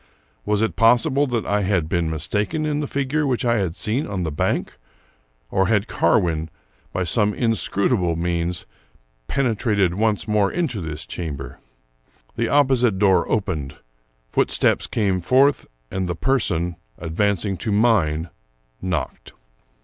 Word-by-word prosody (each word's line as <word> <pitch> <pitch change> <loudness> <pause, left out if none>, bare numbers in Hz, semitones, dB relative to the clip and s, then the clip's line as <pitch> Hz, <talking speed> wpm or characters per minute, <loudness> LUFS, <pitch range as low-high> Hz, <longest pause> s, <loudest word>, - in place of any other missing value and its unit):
Was 105 +1 +2
it 110 - -1
possible 130 +5 +4
that 120 -3 -1
I 105 0 +1
had 95 -5 +1
been 85 -1 0
mistaken 105 - -1
in 150 -1 0
the 150 - -2
figure 140 +2 -1
which 125 -2 0
I 120 -1 +3
had 90 -5 -1
seen 120 +8 -1
on 95 -3 -3
the 80 - -2
bank? 75 - -1 0.7
or 95 -1 +2
had 105 +1 +1
Carwin, 80 -5 +1 0.4
by 95 - -1
some 105 +4 +1
inscrutable 100 -5 +1
means, 85 +1 -2 0.6
penetrated 110 -8 +1
once 105 +1 0
more 105 -2 +2
into 155 - -2
this 80 -1 -5
chamber? 75 -6 -6 0.8
The 115 0 -1
opposite 130 -7 +3
door 95 -1 +3
opened; 80 -10 -2 0.6
foot - - +2
steps - - +2
came 95 -4 0
forth, 135 - +3 0.2
and 95 -1 -2
the 90 - -1
person, 90 -8 0 0.2
advancing 100 +3 -1
to 110 +5 -3
mine, 90 -8 +2 0.5
knocked. 95 -1 -4
100 Hz, 140 wpm, -22 LUFS, 85-120 Hz, 0.8 s, possible